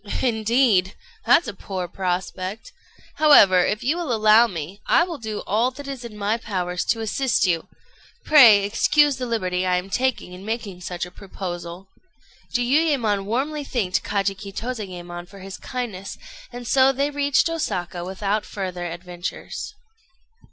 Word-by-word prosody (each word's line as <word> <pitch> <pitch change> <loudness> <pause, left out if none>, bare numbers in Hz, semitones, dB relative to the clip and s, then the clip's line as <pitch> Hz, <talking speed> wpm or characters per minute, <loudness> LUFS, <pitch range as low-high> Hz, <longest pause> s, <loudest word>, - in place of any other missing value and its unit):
"Indeed, 220 -4 +2 0.3
that's 330 - +5
a 205 - -4
poor 190 -2 -5
prospect! 185 - -4 0.5
However, 200 -12 +7
if 210 - -1
you 290 +7 +1
will 340 -7 -3
allow 220 +1 +5
me, 180 +1 -7
I - - +5
will 340 -4 -5
do 220 -2 -5
all 225 +5 +2
that 275 +2 -10
is 270 -3 -6
in 225 -3 -9
my 210 +2 0
power 185 -6 -3
to 225 +5 0
assist 235 +1 +1
you. 170 -3 0 0.6
Pray 235 -10 +8
excuse 280 +6 +3
the 250 -1 -4
liberty 185 -6 -1
I 180 -1 +2
am 180 +2 -3
taking 255 -7 -1
in 180 +1 -10
making 210 -4 -5
such 175 0 -4
a 180 - -12
proposal." 180 -1 -7 0.6
Jiuyémon 245 -5 +1
warmly 280 +8 -2
thanked 220 -10 -1
Kajiki 195 0 -2
Tozayémon 180 -7 -6
for 200 +1 -14
his 195 0 -8
kindness; 225 -7 -5 0.3
and 245 0 -8
so 265 +2 +5
they 280 +2 -1
reached 285 +1 +2
Osaka 185 - -3
without 195 +3 -2
further 180 -3 -5
adventures. 175 - -6
210 Hz, 150 wpm, -23 LUFS, 185-250 Hz, 0.6 s, Pray